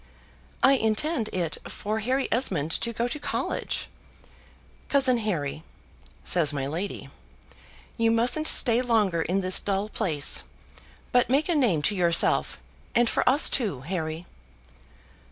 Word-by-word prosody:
"I 270 - +6
intend 230 +2 0
it 170 -4 -3
for 215 +2 -4
Harry 260 +5 -1
Esmond 175 - 0
to 235 - -1
go 235 +1 -2
to 300 +5 -5
college. - - -3 1.0
Cousin 260 -3 +3
Harry," 160 -9 -3 0.6
says 165 -5 +2
my 140 -2 -3
lady, 170 +8 -5 0.9
"you 230 0 +2
mustn't 245 +7 +2
stay 240 -1 +4
longer 215 -9 +1
in 185 +4 -1
this 185 0 +3
dull 200 +1 -2
place, 160 -11 +1 0.7
but 245 -1 +2
make 280 +4 +1
a 350 - +1
name 225 - +1
to 205 - 0
yourself, 170 -2 +2 0.4
and 240 0 +3
for - - 0
us 280 +4 +4
too, 200 - -1
Harry." 160 +1 -5
215 Hz, 135 wpm, -25 LUFS, 170-245 Hz, 1.0 s, I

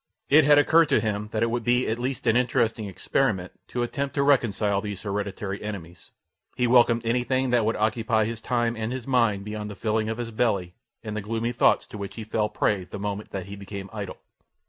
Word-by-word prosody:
It 150 +1 +7
had 145 0 +6
occurred 160 +2 +5
to 140 - +4
him 105 -1 -2
that 110 - 0
it 115 - +1
would 120 0 -1
be 125 +2 +2
at 110 +2 -1
least 130 +2 -3
an 115 -1 +3
interesting 115 -3 +1
experiment 95 -1 -1 0.2
to 120 - -2
attempt 140 +3 -3
to 140 - +2
reconcile 110 -7 +2
these 105 -2 -6
hereditary 100 -1 -3
enemies. 90 -5 -7 0.5
He 125 - +1
welcomed 120 -1 +4
anything 125 +2 +1
that 120 -3 +3
would 115 - +1
occupy 110 0 +1
his 115 0 -5
time 120 -1 0
and 110 +1 -3
his 130 -2 -4
mind 115 -7 +2
beyond 105 0 -5
the 105 - -7
filling 110 +1 -1
of 110 - -3
his 120 -1 -4
belly 100 -6 0 0.3
and 105 -2 -5
the 105 - -2
gloomy 115 +3 -2
thoughts 120 - +3
to 105 - -10
which 100 -1 -6
he 115 - -6
fell 105 0 -1
prey 95 -4 0
the 100 - -8
moment 105 +1 -4
that 95 -2 -5
he 100 +1 -8
became 100 -1 -8
idle. 100 -3 -5
110 Hz, 215 wpm, -25 LUFS, 105-120 Hz, 0.5 s, It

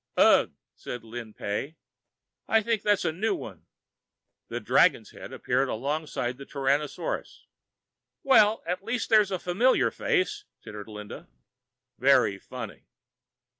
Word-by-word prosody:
"Ugh!" - - +5 0.2
said 125 -2 -7
Lin 115 0 -8
Pey. 135 +10 -4 0.7
"I 225 -1 +3
think 225 -1 0
that's 205 -3 +1
a 160 - +2
new 200 +8 -1
one." - - -10 0.8
The - - -4
dragon's - - +3
head - - -10
appeared 130 +2 0
alongside 140 -1 -3
the 140 - -8
Tyrannosaur's. 145 - -2 0.8
"Well, 220 -5 +5
at 180 +3 -3
least 230 +3 -2
there's 215 -3 +5
a 190 - -1
familiar 190 +9 +2
face," 410 +2 -1 0.2
tittered 105 0 -9
Linda. 105 -1 -9 0.7
"Very 130 -7 +4
funny." - - -9
160 Hz, 125 wpm, -27 LUFS, -, 0.8 s, Ugh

